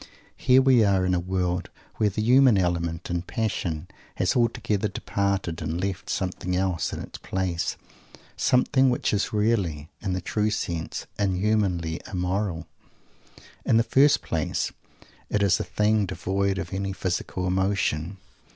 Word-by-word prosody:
Here 130 +1 +4
we 130 -4 +5
are 95 -2 +3
in 90 - +1
a 90 - +2
world 90 0 -1 0.3
where 105 - +3
the 105 +2 -2
human 125 -1 +6
element, 85 -1 -1
in 85 -1 0
passion, 90 -5 -2 0.3
has 90 - +1
altogether 110 -3 +1
departed, 100 -4 -2
and 80 +2 -2
left 95 0 -3
something 90 -1 -2
else 90 -2 0
in - - -5
its - - -8
place; 95 -3 -2 0.6
something 130 +1 +3
which 125 - 0
is 105 - 0
really, 100 -9 0
in 95 -3 -2
the 95 - -1
true 105 +4 0
sense, 85 -6 -3
"inhumanly 95 -4 0
immoral." 90 -2 -1 1.0
In 115 - +3
the 115 - +4
first 140 +5 +4
place, 80 -2 -1 0.6
it 105 -1 +1
is 95 -2 +3
a - - -1
thing 105 -1 +1
devoid 95 +1 -1
of 100 - -5
any 95 0 -2
physical 90 0 -2
emotion. 95 -2 0
95 Hz, 145 wpm, -25 LUFS, 90-105 Hz, 1.0 s, human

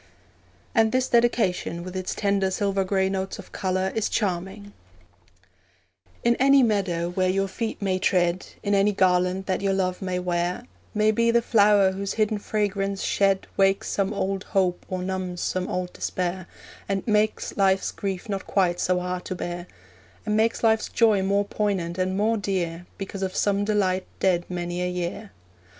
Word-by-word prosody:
And 225 -1 +3
this 255 0 +1
Dedication, 230 -8 +1
with 185 +1 -8
its 185 -1 -3
tender 200 -2 +1
silver 195 0 0
grey 190 0 +1
notes 190 0 -3
of - - -12
colour, 185 0 -1
is 220 -1 0
charming: 195 +1 -2 1.5
In 235 0 +4
any 275 0 +5
meadow 185 -6 0
where 185 0 +1
your 195 +1 +1
feet 220 +4 -4
may 185 -1 0
tread, 180 -1 +1 0.2
In 205 - 0
any 200 +1 +3
garland 185 0 +2
that 190 0 -1
your 195 -1 +1
love 185 -1 -1
may 185 -1 -2
wear, 180 +4 -1 0.3
May 215 +1 +4
be 230 +2 +2
the 235 0 +4
flower 205 -4 +4
whose 195 +1 -3
hidden 215 -1 +1
fragrance 200 -2 -1
shed 195 -1 +2
Wakes 195 0 +2
some 195 0 0
old 195 -1 -2
hope 185 -2 0
or 185 -1 -3
numbs 185 -1 -3
some 185 0 -1
old 180 -1 -3
despair, 185 0 -3 0.4
And 195 -1 -1
makes 215 0 +1
life's 195 -1 +2
grief 195 +1 -4
not 195 -2 -4
quite 180 -3 +1
so 180 0 +1
hard 180 0 -3
to 185 - -4
bear, 175 0 -5 0.6
And 210 -1 0
makes 225 +2 +1
life's 220 -1 +3
joy 220 -4 +3
more 200 +1 +1
poignant 190 -5 -2
and 185 +1 0
more 220 +2 +2
dear 180 -4 -2
Because 195 0 -6
of 190 -1 -2
some 200 0 +1
delight 190 -3 0
dead 175 -2 +2
many 175 0 -3
a 180 - 0
year. 180 +4 -4
195 Hz, 170 wpm, -25 LUFS, 185-205 Hz, 1.5 s, any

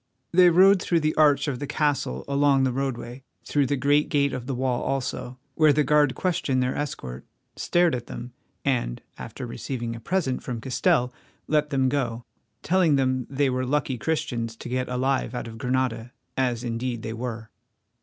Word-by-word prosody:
They 180 +1 +7
rode 190 +3 +6
through 170 -3 +1
the 155 0 +1
arch 145 -2 +4
of 130 -4 -2
the 145 - -4
castle 145 - -1
along 140 -1 +3
the 130 - +2
roadway, 125 -1 -4 0.2
through 145 -2 +1
the 145 - +1
great 145 +3 +2
gate 140 -1 +2
of 125 -1 -5
the 135 - -2
wall 125 -1 0
also, 130 -1 -3 0.2
where 155 +1 +5
the 150 +1 +3
guard 145 -1 +3
questioned 140 -8 0
their 125 - -1
escort, 65 - -5 0.3
stared 175 -1 +2
at 120 -2 -4
them, 120 +1 -8 0.3
and, 120 - -1 0.2
after - - -7
receiving 115 - -4
a - - -7
present 140 0 -1
from 120 -3 -5
Castell, 125 0 +1 0.3
let 150 -1 +2
them 135 -3 +2
go, 125 -4 -1 0.4
telling 175 -4 +3
them 130 -2 0
they 140 0 +1
were 130 0 -1
lucky 130 -1 -1
Christians 125 -8 -2
to - - -8
get 125 0 -1
alive 130 -1 0
out 120 - -4
of 115 0 -9
Granada, 125 -2 -1 0.2
as 125 -2 0
indeed 120 0 -3
they 110 - -4
were. 115 -1 -5
130 Hz, 180 wpm, -25 LUFS, 120-145 Hz, 0.4 s, They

